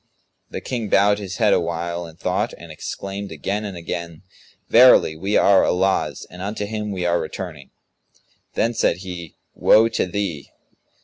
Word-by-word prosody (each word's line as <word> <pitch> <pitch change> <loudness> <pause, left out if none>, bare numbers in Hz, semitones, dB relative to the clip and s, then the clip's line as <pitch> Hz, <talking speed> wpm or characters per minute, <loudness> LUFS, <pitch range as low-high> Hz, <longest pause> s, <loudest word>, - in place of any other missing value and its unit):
The - - -6
King 115 -5 -4
bowed 100 +1 +4
his 95 -2 -6
head 105 -3 +4
awhile 85 0 -2
in 80 - -13
thought 95 +6 -1
and 85 - -11
exclaimed 100 +5 -6
again 95 +7 -3
and 100 -4 -6
again, 85 0 -6 0.4
"Verily, 120 -9 +6
we 95 +6 0
are 100 -1 +5
Allah's 95 +2 0
and 90 +1 -10
unto 105 +1 -3
Him 105 0 -4
we 95 -3 -3
are 85 0 +2
returning!" 80 -3 -7 0.9
Then 115 - +1
said - - +1
he 85 -3 -7 0.2
"Woe 115 +1 +5
to 115 - -1
thee! 90 -7 -4
95 Hz, 160 wpm, -22 LUFS, 85-105 Hz, 0.9 s, Verily